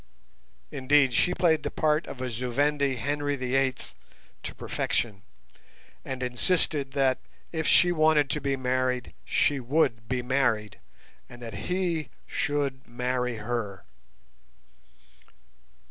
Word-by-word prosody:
Indeed, 135 Hz, -1 st, +3 dB
she 180 Hz, +9 st, +3 dB
played 160 Hz, -3 st, +3 dB
the -, -, -2 dB
part 155 Hz, +1 st, +1 dB
of 130 Hz, -, -7 dB
a 130 Hz, -1 st, -2 dB
Zu 125 Hz, +2 st, -3 dB
Vendi 140 Hz, +1 st, +2 dB
Henry 145 Hz, +4 st, -1 dB
the 130 Hz, -1 st, -3 dB
Eighth 135 Hz, -1 st, 0 dB, 0.5 s
to -, -, -6 dB
perfection, 105 Hz, -5 st, -2 dB, 0.8 s
and 130 Hz, -1 st, -4 dB
insisted 135 Hz, +3 st, +1 dB
that, 135 Hz, -2 st, +2 dB, 0.3 s
if 160 Hz, -2 st, -2 dB
she 175 Hz, -, +6 dB
wanted 155 Hz, -3 st, +4 dB
to 150 Hz, -, -1 dB
be 140 Hz, -1 st, 0 dB
married, 130 Hz, -1 st, -1 dB
she 145 Hz, -2 st, +2 dB
would 120 Hz, -3 st, +1 dB
be 125 Hz, -1 st, -1 dB
married, 120 Hz, -5 st, 0 dB, 0.5 s
and 120 Hz, -, -11 dB
that 115 Hz, -2 st, -6 dB, 0.2 s
he 175 Hz, -6 st, 0 dB, 0.2 s
should 140 Hz, -2 st, -2 dB
marry 125 Hz, 0 st, -1 dB
her. 105 Hz, -3 st, -3 dB
130 Hz, 125 wpm, -27 LUFS, 125-145 Hz, 0.8 s, she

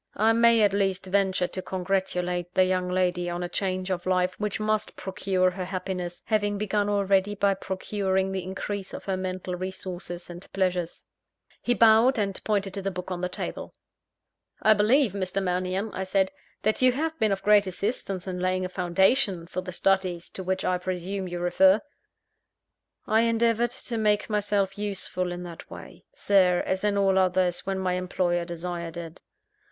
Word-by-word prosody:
I 220 Hz, +2 st, +4 dB
may 230 Hz, -1 st, +5 dB
at 200 Hz, -1 st, +3 dB
least 195 Hz, -2 st, 0 dB
venture 190 Hz, -1 st, +1 dB
to 185 Hz, -, -4 dB
congratulate 180 Hz, -1 st, -2 dB
the 185 Hz, -, +6 dB
young 185 Hz, -1 st, 0 dB
lady 180 Hz, -1 st, 0 dB
on 175 Hz, +1 st, -3 dB
a -, -, -2 dB
change 185 Hz, +1 st, -2 dB
of 180 Hz, -1 st, -3 dB
life 185 Hz, 0 st, +2 dB
which 210 Hz, -1 st, -2 dB
must 215 Hz, 0 st, -1 dB
procure 190 Hz, -1 st, 0 dB
her 185 Hz, 0 st, -5 dB
happiness, 180 Hz, -1 st, -4 dB
having 205 Hz, -2 st, +1 dB
begun 205 Hz, 0 st, 0 dB
already 200 Hz, 0 st, +2 dB
by 200 Hz, 0 st, +2 dB
procuring 190 Hz, 0 st, -1 dB
the 190 Hz, -1 st, -2 dB
increase 190 Hz, +1 st, -5 dB
of -, -, -9 dB
her 195 Hz, -, -1 dB
mental 185 Hz, -1 st, -4 dB
resources 180 Hz, -1 st, -5 dB
and 175 Hz, +1 st, -11 dB
pleasures." 180 Hz, -3 st, -1 dB, 0.6 s
He 245 Hz, -, +1 dB
bowed, 230 Hz, +3 st, +6 dB
and 200 Hz, -3 st, -1 dB
pointed 200 Hz, -3 st, 0 dB
to 195 Hz, -, -4 dB
the 195 Hz, -, -1 dB
book 180 Hz, 0 st, -6 dB
on 175 Hz, -1 st, -3 dB
the 180 Hz, -, -1 dB
table. -, -, -5 dB, 0.8 s
"I 215 Hz, -, +6 dB
believe, 215 Hz, +2 st, +3 dB
Mr. 190 Hz, -1 st, -1 dB
Mannion," 185 Hz, +2 st, -1 dB
I 190 Hz, -, -3 dB
said, 190 Hz, 0 st, +1 dB, 0.3 s
"that 215 Hz, +3 st, +1 dB
you 255 Hz, -1 st, +5 dB
have 320 Hz, +4 st, -2 dB
been 215 Hz, -2 st, +2 dB
of 195 Hz, -, -2 dB
great 205 Hz, -1 st, +5 dB
assistance 190 Hz, -1 st, -3 dB
in 185 Hz, -1 st, -4 dB
laying 185 Hz, 0 st, 0 dB
a -, -, -4 dB
foundation 185 Hz, +1 st, +2 dB
for 185 Hz, +2 st, -4 dB
the 180 Hz, 0 st, -7 dB
studies 185 Hz, -1 st, 0 dB
to -, -, -6 dB
which 190 Hz, 0 st, -2 dB
I 180 Hz, -1 st, +1 dB
presume 185 Hz, +1 st, -3 dB
you 175 Hz, 0 st, -4 dB
refer." 185 Hz, +3 st, +4 dB, 1.3 s
"I 220 Hz, +1 st, +3 dB
endeavoured 230 Hz, 0 st, +2 dB
to 230 Hz, -1 st, -4 dB
make 210 Hz, 0 st, +1 dB
myself 205 Hz, -1 st, 0 dB
useful 190 Hz, -3 st, -2 dB
in 175 Hz, 0 st, -5 dB
that 170 Hz, -2 st, -10 dB
way, -, -, -11 dB
Sir, 190 Hz, -, +3 dB
as 190 Hz, +1 st, -1 dB
in 205 Hz, -1 st, +1 dB
all 195 Hz, -1 st, +3 dB
others, 185 Hz, -1 st, +1 dB
when 195 Hz, -1 st, -1 dB
my 185 Hz, -1 st, 0 dB
employer 180 Hz, -1 st, 0 dB
desired 170 Hz, -1 st, -5 dB
it." 165 Hz, 0 st, -8 dB
190 Hz, 180 wpm, -26 LUFS, 180-205 Hz, 1.3 s, the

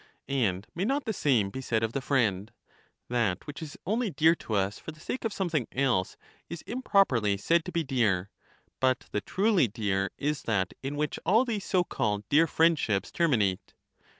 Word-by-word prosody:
And 105 Hz, -8 st, 0 dB
may 175 Hz, -, -2 dB
not 275 Hz, +6 st, 0 dB
the 220 Hz, -, -1 dB
same 120 Hz, -, +2 dB
be 130 Hz, -, -5 dB
said 115 Hz, -3 st, 0 dB
of 115 Hz, +1 st, -1 dB
the 140 Hz, -, -2 dB
friend? 110 Hz, -7 st, 0 dB, 0.6 s
That 115 Hz, -7 st, 0 dB
which 145 Hz, +2 st, -8 dB
is 155 Hz, -2 st, -8 dB
only 220 Hz, +4 st, 0 dB
dear 160 Hz, -1 st, +4 dB
to 110 Hz, -, -4 dB
us 100 Hz, +1 st, 0 dB
for -, -, -8 dB
the 155 Hz, -, -17 dB
sake 250 Hz, -, -5 dB
of 225 Hz, -, -1 dB
something 170 Hz, -, -1 dB
else 125 Hz, -9 st, 0 dB, 0.3 s
is 170 Hz, -, -7 dB
improperly 140 Hz, -, +2 dB
said 165 Hz, +11 st, +2 dB
to 180 Hz, -, -5 dB
be 170 Hz, -2 st, 0 dB
dear, 105 Hz, -9 st, 0 dB, 0.5 s
but 130 Hz, -1 st, +2 dB
the 105 Hz, -, -1 dB
truly 195 Hz, -, +2 dB
dear 100 Hz, -3 st, -1 dB
is 150 Hz, 0 st, -1 dB
that 95 Hz, -4 st, 0 dB
in 135 Hz, +2 st, -4 dB
which 150 Hz, 0 st, -2 dB
all 220 Hz, +9 st, +4 dB
these 215 Hz, -5 st, -3 dB
so 185 Hz, -3 st, +2 dB
called 105 Hz, -, -2 dB
dear 160 Hz, +3 st, +5 dB
friendships 155 Hz, -11 st, +2 dB
ter 170 Hz, -, +2 dB
minate. 100 Hz, -, 0 dB
135 Hz, 190 wpm, -28 LUFS, 105-170 Hz, 0.6 s, dear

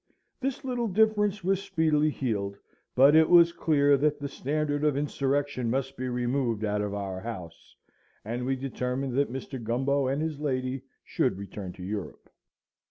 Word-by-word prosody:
This 270 Hz, 0 st, -3 dB
little 245 Hz, -2 st, -1 dB
difference 210 Hz, -1 st, +2 dB
was 195 Hz, +1 st, +1 dB
speedily 160 Hz, -6 st, +2 dB
healed; 100 Hz, -8 st, -2 dB, 0.4 s
but 140 Hz, +4 st, +7 dB
it 160 Hz, 0 st, +6 dB
was 170 Hz, -1 st, +7 dB
clear 145 Hz, -4 st, +3 dB
that 150 Hz, +1 st, +1 dB
the 145 Hz, -, -3 dB
Standard 145 Hz, +1 st, -2 dB
of 150 Hz, -2 st, +2 dB
Insurrection 140 Hz, -3 st, -1 dB
must 135 Hz, +2 st, -1 dB
be 130 Hz, -1 st, -3 dB
removed 120 Hz, -2 st, 0 dB
out 105 Hz, 0 st, 0 dB
of 100 Hz, -1 st, -3 dB
our 95 Hz, -2 st, -4 dB
house; 90 Hz, -7 st, -8 dB, 0.5 s
and 120 Hz, +3 st, -3 dB
we 135 Hz, +1 st, 0 dB
determined 130 Hz, 0 st, -3 dB
that 140 Hz, -2 st, +1 dB
Mr. 130 Hz, -1 st, -6 dB
Gumbo 135 Hz, +4 st, +1 dB
and 135 Hz, +2 st, 0 dB
his 155 Hz, -2 st, -2 dB
lady 130 Hz, -3 st, -2 dB, 0.2 s
should -, -, 0 dB
return 100 Hz, -1 st, -7 dB
to 90 Hz, -, -10 dB
Europe. 100 Hz, 0 st, -6 dB
135 Hz, 165 wpm, -28 LUFS, 120-150 Hz, 0.5 s, but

